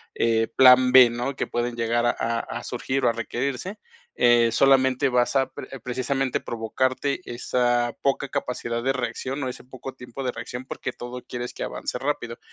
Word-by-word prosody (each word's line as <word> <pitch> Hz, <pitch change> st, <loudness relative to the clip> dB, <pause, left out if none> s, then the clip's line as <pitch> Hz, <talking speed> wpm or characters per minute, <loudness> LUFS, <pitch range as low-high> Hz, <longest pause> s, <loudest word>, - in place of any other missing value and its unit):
eh, 115 Hz, -1 st, +2 dB
plan 130 Hz, -1 st, +7 dB
b, 130 Hz, -2 st, +9 dB
¿no? 125 Hz, +3 st, -3 dB
Que -, -, -2 dB
pueden 120 Hz, 0 st, -2 dB
llegar 120 Hz, +1 st, 0 dB
a 120 Hz, -, +4 dB, 0.3 s
a -, -, -6 dB
surgir 135 Hz, 0 st, -2 dB
o -, -, +5 dB
a -, -, 0 dB
requerirse, 130 Hz, -, -3 dB, 0.4 s
eh, 120 Hz, -1 st, +4 dB
solamente 130 Hz, +1 st, +4 dB
vas 125 Hz, +2 st, +1 dB
a 135 Hz, -1 st, +2 dB
pre 135 Hz, -, -9 dB
precisamente 130 Hz, +1 st, -1 dB
provocarte 130 Hz, +6 st, -1 dB
esa 120 Hz, 0 st, 0 dB
poca 140 Hz, 0 st, 0 dB
capacidad 120 Hz, -1 st, -3 dB
de 135 Hz, +2 st, +1 dB
reacción 135 Hz, +1 st, -3 dB
o 130 Hz, -, -2 dB
ese -, -, -9 dB
poco 130 Hz, +1 st, -9 dB
tiempo 125 Hz, +1 st, -8 dB
de 125 Hz, -, -1 dB
reacción, 125 Hz, +2 st, -7 dB
porque 130 Hz, -, -5 dB
todo 125 Hz, +1 st, -8 dB
quieres 120 Hz, 0 st, -6 dB
que -, -, -5 dB
avance -, -, -4 dB
rápido. 135 Hz, -5 st, -3 dB
125 Hz, 175 wpm, -24 LUFS, 120-135 Hz, 0.4 s, b